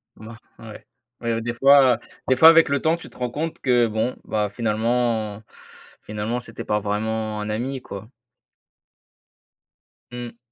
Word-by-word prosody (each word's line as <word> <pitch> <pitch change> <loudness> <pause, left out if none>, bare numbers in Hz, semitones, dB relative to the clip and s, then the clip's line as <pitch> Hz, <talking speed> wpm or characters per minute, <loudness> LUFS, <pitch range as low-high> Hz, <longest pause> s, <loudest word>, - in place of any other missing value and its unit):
Ben, 110 +1 -11 0.2
ouais, 110 -2 -11 0.4
ouais, 115 -1 -1
des 120 +1 -3
fois 135 -1 +5 0.3
des 130 - +4
fois, 160 +5 +9
avec 165 -3 +6
le 140 -1 0
temps, 160 +1 +2
tu - - -12
te - - -18
rends 125 -1 -2
compte 155 +5 -4
que, 120 -3 +3
bon, 110 +3 -2
bah, 105 -1 -1
finalement 110 -1 -1 0.6
finalement, 105 +3 -3
c'était 115 -2 -7
pas 105 0 0
vraiment 110 +1 -2
un 105 - -4
ami, 125 +4 -3
quoi. 100 0 -9 2.0
Mmh. 120 -1 -8
115 Hz, 150 wpm, -23 LUFS, 110-125 Hz, 2.0 s, fois